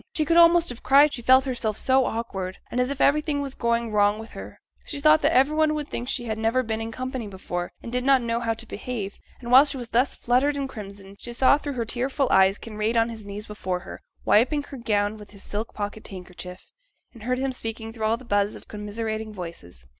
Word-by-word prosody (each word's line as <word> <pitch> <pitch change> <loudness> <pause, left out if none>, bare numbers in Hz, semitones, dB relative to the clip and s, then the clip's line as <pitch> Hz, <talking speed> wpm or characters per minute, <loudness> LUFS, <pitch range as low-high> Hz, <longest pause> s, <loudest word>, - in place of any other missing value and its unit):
She 310 - +1
could 335 - +2
almost 340 0 +6
have 245 -1 -7
cried, 285 +2 +5
she 240 - -5
felt 260 +2 +5
herself 235 -5 -2
so 260 0 +3
awkward, 195 -5 -4
and 250 - +1
as 250 - 0
if 280 -1 -4
everything 300 0 +2
was 280 -2 -3
going 235 -2 0
wrong 205 0 +3
with 220 +1 -9
her; - - -10 0.2
she 285 - -5
thought 305 +2 +5
that - - +3
every 270 +4 +3
one 310 -1 +3
would 300 -1 -4
think 245 +2 -4
she 245 - -2
had 220 -1 -3
never 225 +4 +1
been 220 -1 -3
in 225 0 -4
company 255 -1 -4
before, 180 -2 -5
and 230 - -7
did 250 0 -1
not 270 -2 +4
know 230 0 -1
how 230 -1 -1
to 235 - -8
behave; 215 -3 -5 0.2
and 240 -1 -7
while 260 +2 +9
she 280 -2 -2
was 240 -2 -7
thus 250 +4 +2
fluttered 265 +4 +1
and 275 -1 -2
crimson, 200 -3 -10
she 240 - -7
saw 260 +3 +5
through 290 -1 -4
her 235 -3 -2
tearful 260 +4 -1
eyes 190 +1 +5
Kinraid 220 +1 -2
on 230 +1 +3
his 220 -3 -9
knees 205 +1 -6
before 185 -4 -4
her, - - -10 0.2
wiping 275 +7 +3
her 280 - -9
gown 210 -2 0
with 210 -1 -12
his 200 -1 -13
silk 215 +2 -4
pocket 205 +1 -5
handkerchief, 180 -1 -10 0.4
and 230 - -14
heard 250 +3 -1
him 265 +1 -1
speaking 225 -2 -5
through 220 -2 -3
all 225 +1 +2
the 255 - -14
buzz 205 -1 +1
of - - -12
commiserating 220 +1 -4
voices. 165 - -9
230 Hz, 235 wpm, -25 LUFS, 210-260 Hz, 0.4 s, while